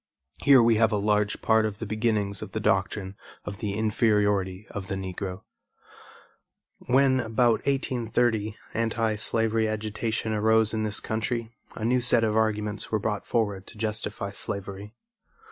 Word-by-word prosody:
Here 135 -4 +7
we 115 -1 +4
have 110 0 +3
a 105 - +1
large 105 0 0
part 110 -1 +4
of 105 -2 -2
the 115 - -5
beginnings 105 -2 -1
of - - -8
the - - -1
doctrine 95 0 0 0.3
of 100 - -6
the 105 -2 -3
inferiority 105 -3 +1
of 100 -2 -6
the 100 - -3
Negro. 95 0 -5 1.4
When, 130 +1 +4
about 115 -1 +2
1830, 120 -5 0 0.2
anti 115 -1 0
slavery 110 +1 +1
agitation 110 +1 -2
arose 110 +1 +3
in 110 - -1
this 105 0 0
country, 115 +1 -2 0.2
a 110 - -4
new 125 +2 +2
set 120 -1 +4
of 110 -1 +1
arguments 105 -1 -1
were 110 - +2
brought 105 -1 -3
forward 100 -5 -1
to - - -12
justify 105 -2 -3
slavery. 100 +2 -5
110 Hz, 150 wpm, -26 LUFS, 105-115 Hz, 1.4 s, Here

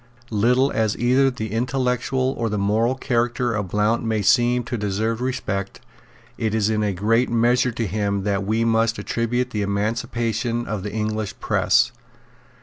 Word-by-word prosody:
Little 125 +6 +3
as 110 -2 0
either 130 +3 +3
the 110 -5 -5
intellectual 125 +2 0
or 115 -1 -1
the 105 - -2
moral 110 +5 +1
character 120 -2 0
of 105 -3 -2
Blount 105 +5 +1
may 110 -2 -1
seem 120 +2 +3
to 120 - -4
deserve 110 +2 -1
respect, 100 -7 -3 0.6
it 110 -1 0
is 110 0 +1
in 110 -1 0
a 105 -1 +1
great 110 +6 +1
measure 120 +2 +2
to 115 - -2
him 100 0 -1
that 100 -1 0
we 110 +3 0
must 115 0 +2
attribute 120 +2 -1
the 105 - -2
emancipation 115 +3 -1
of 105 -2 -3
the 105 +1 -5
English 110 -1 -3
press. - - +2
115 Hz, 160 wpm, -22 LUFS, 105-120 Hz, 0.6 s, Little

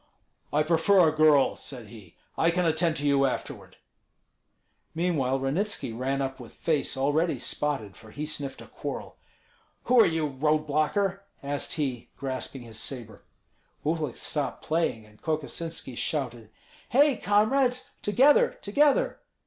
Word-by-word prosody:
"I 150 +1 +3
prefer 170 +3 +4
a 155 - -4
girl," 155 -3 +5
said 120 -6 -9
he; 105 -7 -14 0.2
"I 165 - +3
can 180 +1 +1
attend 165 0 +1
to 145 - -3
you 140 -1 +4
afterward." 130 - -5 1.2
Meanwhile 150 -6 +1
Ranitski 140 - -1
ran 135 +3 -1
up 135 0 -4
with 120 -3 -11
face 150 -4 -1
already 150 +5 +1
spotted, 135 -10 -3
for 110 0 -15
he 150 +7 -5
sniffed 145 -3 -5
a - - -13
quarrel. - - -6 0.7
"Who 250 0 +4
are - - +6
you, 160 -2 0
road 150 +2 +1
blocker?" 185 +7 0 0.2
asked 140 0 -2
he, 130 -6 -3
grasping 130 -1 -4
his 110 -2 -10
sabre. 120 -5 -7 0.6
Uhlik 155 -4 -1
stopped 145 -2 -3
playing, 155 -9 0
and 105 0 -21
Kokosinski 160 -2 -3
shouted, 120 -6 -3 0.4
"Hei, 280 0 +4
comrades! 245 +6 +2
together, 260 +8 +4
together!" 280 +8 +2
150 Hz, 140 wpm, -27 LUFS, 135-170 Hz, 1.2 s, are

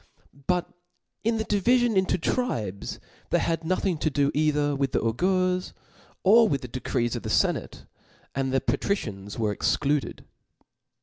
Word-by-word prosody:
But 180 -1 +1 0.6
in 225 +1 +1
the 220 - -2
divifion 235 +3 +2
into 190 -1 +2
tribes 115 - -2 0.3
they - - +3
had 165 -1 -1
nothing 180 0 0
to 155 - +1
do 140 0 +1
either 150 -1 +1
with 135 -1 -1
the - - +3
augurs 185 +10 0 0.5
or 220 +3 +6
with 140 -5 0
the - - -5
decrees 120 -1 -2
of - - -4
the - - -5
ienate; - - 0 0.5
and 135 -1 -1
the 135 -1 +2
patricians 110 - -2
were 110 -3 0
excluded. 145 +6 0
150 Hz, 145 wpm, -26 LUFS, 130-190 Hz, 0.6 s, or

